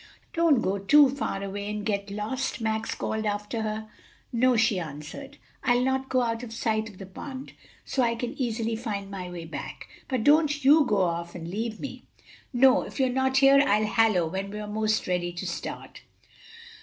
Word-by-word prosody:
"Don't 330 -6 +3
go 195 +1 0
too 280 +7 +6
far 200 -7 -3
away 200 +1 -4
and 210 -1 -4
get 200 -2 -1
lost," 220 +7 -3
Max 220 -1 -1
called 220 0 -2
after 210 +2 -2
her. 215 0 -3 0.5
"No," 250 +1 +4
she 225 -4 +3
answered, 165 - -8 0.3
"I'll 245 -1 +3
not 265 0 0
go 255 -1 +2
out 230 -1 -1
of 245 -3 -8
sight 220 -1 -1
of 200 - -15
the 195 - -8
pond; 260 +8 -8 0.3
so 265 - 0
I 235 -1 +2
can 240 +2 -4
easily 230 -2 -1
find 205 -4 -4
my 185 -2 -5
way 175 -2 -7
back. 160 - -7 0.2
But 255 -5 -1
don't 295 -1 +3
you 295 +2 +7
go 205 -4 +2
off 170 0 -2
and 165 -1 -6
leave 220 +4 -3
me." 280 - -8 0.4
"No; 255 0 +5
if - - -8
you're 260 -1 +3
not 265 +1 +1
here, 275 0 +7
I'll 215 -4 +3
hallo 215 -5 +3
when 190 +4 -4
we're 210 +1 -5
'most 215 +1 0
ready 180 -1 -1
to 175 - -5
start." - - -6
220 Hz, 190 wpm, -27 LUFS, 200-260 Hz, 0.5 s, you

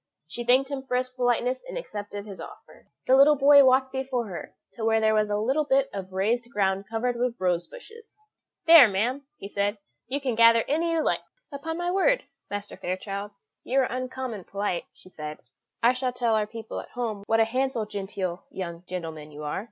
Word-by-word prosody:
She 240 +8 -5
thanked 260 +3 +3
him 275 -1 -3
for 255 -2 -1
his 255 0 -2
politeness, 250 0 0
and - - -5
accepted 205 - -6
his 200 -3 -9
offer. - - -13 0.2
The 260 - +5
little 285 +3 +7
boy 285 0 +7
walked 260 0 +4
before 265 -2 -2
her 175 - -8 0.2
to 230 - -7
where 225 0 +3
there 220 0 +3
was 215 -1 +2
a 205 0 0 0.3
bit 270 0 +3
of 190 -1 -6
raised 230 +6 0
ground 195 -2 0
covered 235 +2 -1
with 245 0 -1
rose 175 -2 0
bushes. 460 -3 -14 0.5
"There, 325 -6 +10
ma'am," 245 +8 -1
he 195 - -8
said, 205 +1 -1 0.3
"you 270 +4 -2
can 265 -3 -1
gather 230 0 +6
any 330 +4 +1
you 320 -1 +1
like." - - +1 0.3
"Upon 320 +4 -5
my 350 0 -1
word, - - +2 0.3
Master 205 0 -5
Fairchild, 195 +2 -4 0.3
you 260 - -1
are - - +3
uncommon 255 -5 -4
polite," 200 -3 -2
she - - -18
said; 150 -2 -7 0.5
"I 240 +2 +6
shall 255 0 -1
tell 240 -2 +1
our 215 -1 +1
people 225 0 -7
at - - -9
home 230 -5 -4
what 225 0 +3
a 225 - +5
handsome 255 -1 -1
genteel 195 -3 -4
young 170 -2 -6
gentleman 160 -4 -6
you 150 0 -9
are. 150 +3 -2
230 Hz, 200 wpm, -26 LUFS, 200-265 Hz, 0.5 s, There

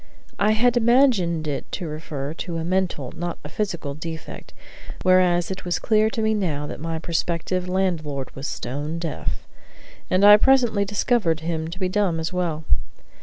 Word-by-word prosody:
I 210 +2 +4
had 240 +2 +3
imagined 225 - +3
it 145 - -4
to 180 - -3
refer 150 -2 -5
to 170 0 -5
a 165 - -2
mental, 175 -6 -1
not 175 0 -4
a 150 - -7
physical, 170 -6 -3
defect; 160 +1 -8 0.5
whereas 180 -1 +4
it 190 - -5
was 175 -1 0
clear 215 +2 +2
to 220 0 -2
me 220 0 +2
now 160 -9 -1
that - - -7
my 165 +1 -3
prospective 170 +2 -2
landlord 160 -8 -1
was 135 +2 -5
stone 145 +6 -4
deaf, 165 -2 -4 0.6
and 185 +2 +4
I 205 0 +10
presently 240 -4 +3
discovered 200 -5 +1
him 160 -1 -2
to 170 +3 -7
be 185 -1 -1
dumb 185 -3 +1
as 160 +3 -3
well. 170 -4 -1
175 Hz, 170 wpm, -23 LUFS, 160-200 Hz, 0.6 s, I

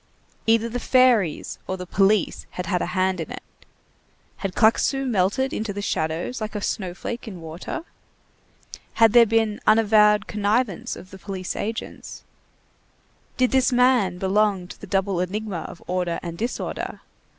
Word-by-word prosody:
Either 225 0 +4
the 240 +2 -4
fairies 245 - +2
or 190 - -2
the 180 - -6
police 195 +2 +1
had 180 - -5
had 180 +1 0
a - - -1
hand 185 -1 +1
in 160 - -6
it. - - -7 0.9
Had 195 -2 -4
Claquesous 270 +4 +3
melted 240 +4 +1
into 215 -1 -2
the 205 - -5
shadows 160 +9 -2
like 215 0 -4
a 210 - -2
snow 185 -3 -3
flake 235 +5 -6
in 190 -5 -7
water? 165 - -6 1.1
Had 225 -2 +5
there 235 -1 +7
been 220 -1 +1
unavowed 210 -1 +5
connivance 210 -1 -1
of 185 - -12
the 190 - -11
police 190 -1 -5
agents? 225 +2 -5 1.1
Did 255 -1 +2
this 265 0 +3
man 245 -7 +3
belong 195 -1 +1
to - - -11
the - - -8
double 195 -2 0
enigma 190 0 -3
of 170 - -12
order 180 -2 -1
and 170 -1 -5
disorder? 235 +7 -4
205 Hz, 155 wpm, -23 LUFS, 185-225 Hz, 1.1 s, there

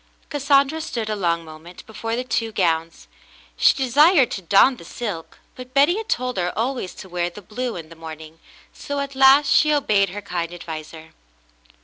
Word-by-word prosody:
Cassandra 280 +1 +2
stood 230 -8 -4
a - - -1
long 170 -4 -1
moment 160 +3 -12
before 225 +1 -4
the 250 - -2
two 230 -3 -2
gowns. 165 -4 -1 0.5
She - - +4
desired 280 +3 +4
to 195 - -4
don 200 +9 +4
the - - -12
silk, 180 -3 -6 0.2
but 255 +1 -12
Betty 290 +6 +4
had 445 0 -6
told 250 -1 -1
her 180 -1 0
always 240 -4 -2
to - - -10
wear 175 -1 -2
the 175 - -12
blue 230 +5 -5
in 165 -3 -8
the 165 - -13
morning, 160 0 -10 0.3
so 285 0 -5
at 280 0 -4
last 270 +2 +5
she 305 - +4
obeyed 210 -9 +2
her 205 +3 -7
kind 170 -3 -4
adviser. 160 -1 -9
215 Hz, 185 wpm, -22 LUFS, 170-270 Hz, 0.5 s, last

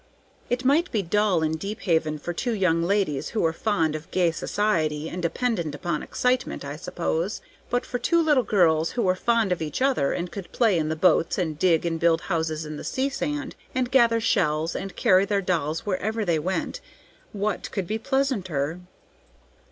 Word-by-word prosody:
It 250 +1 -1
might 310 +7 +3
be 210 -3 0
dull 190 -1 +2
in 160 0 0
Deephaven 165 -6 -1
for 175 +4 -5
two 240 +7 -2
young 180 -5 +2
ladies 175 -5 0
who - - +3
were 160 -1 +2
fond 165 -5 0
of 155 +3 -7
gay 180 -3 +2
society 160 -6 0
and 180 +2 -5
dependent 170 - -1
upon 150 +1 -2
excitement, 250 - -1
I 145 +1 -5
suppose; 175 +3 -2 0.3
but 245 0 0
for 245 - -3
two 335 +7 +2
little 300 -5 +4
girls 170 -7 +2
who 240 - 0
were 185 - +3
fond 225 +1 +1
of 180 - 0
each 150 -2 -3
other 260 - +2
and 175 0 -3
could 195 -3 -8
play 220 -8 +3
in 155 -1 -1
the 160 - -1
boats, 165 0 +3
and 160 -5 -2
dig 170 -3 +3
and 165 -1 -1
build 165 -1 +3
houses 160 -3 -2
in 155 0 -6
the - - -7
sea 265 +1 -1
sand, 280 0 -3 0.2
and 255 -1 0
gather 235 -4 +4
shells, 165 -7 +1
and 195 -1 -5
carry 185 +1 +4
their 200 0 +1
dolls 165 -4 -1
wherever 215 +3 -1
they 170 -3 +1
went, 185 +5 -3 0.5
what 205 -1 -2
could 195 -3 -2
be 215 +5 -2
pleasanter?" 185 - -1
185 Hz, 190 wpm, -25 LUFS, 160-225 Hz, 0.5 s, little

